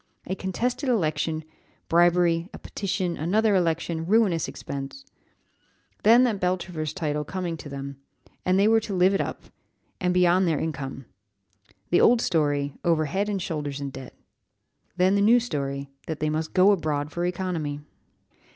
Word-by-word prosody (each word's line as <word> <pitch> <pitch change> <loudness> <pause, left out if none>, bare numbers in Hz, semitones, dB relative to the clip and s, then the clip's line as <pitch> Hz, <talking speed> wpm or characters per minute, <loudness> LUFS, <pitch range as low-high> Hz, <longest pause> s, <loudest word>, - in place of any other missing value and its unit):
A 185 - -3
contested 240 - -2
election 160 -7 0 0.4
bribery 170 0 +3
a - - -7
petition 190 -3 -3
another 210 +7 +2
election 165 -2 0
ruinous 200 -5 +3
expense. 140 - -7 1.0
Then 235 +3 +6
that 225 -6 +1
Beltravers 180 -4 -2
title 150 -5 -2
coming 175 +1 -4
to 150 - -9
them: 140 0 -6 0.5
and 185 +1 +2
they 200 +2 +4
were 225 0 +5
to 210 -3 -5
live 185 +2 +4
up - - -4
to - - -22
it, - - -35 0.5
and 180 -1 +1
beyond 180 +1 +3
their 160 -3 +1
income. 140 -4 -4 0.9
The 175 - +5
old 240 0 +6
story 145 - 0
over 165 -2 +2
head 195 +7 -1
and 200 -2 -1
shoulders 150 -5 -4
in 140 -1 -4
debt. 130 -1 -10 0.8
Then 185 +1 +4
the 200 - +2
new 230 +4 +6
story, 140 - -4 0.2
that 160 -3 -4
they 155 0 0
must 155 +1 -3
go 190 +2 +6
abroad 150 -5 -1
for 175 - -3
economy!" 175 -5 -2
175 Hz, 160 wpm, -25 LUFS, 150-190 Hz, 1.0 s, Then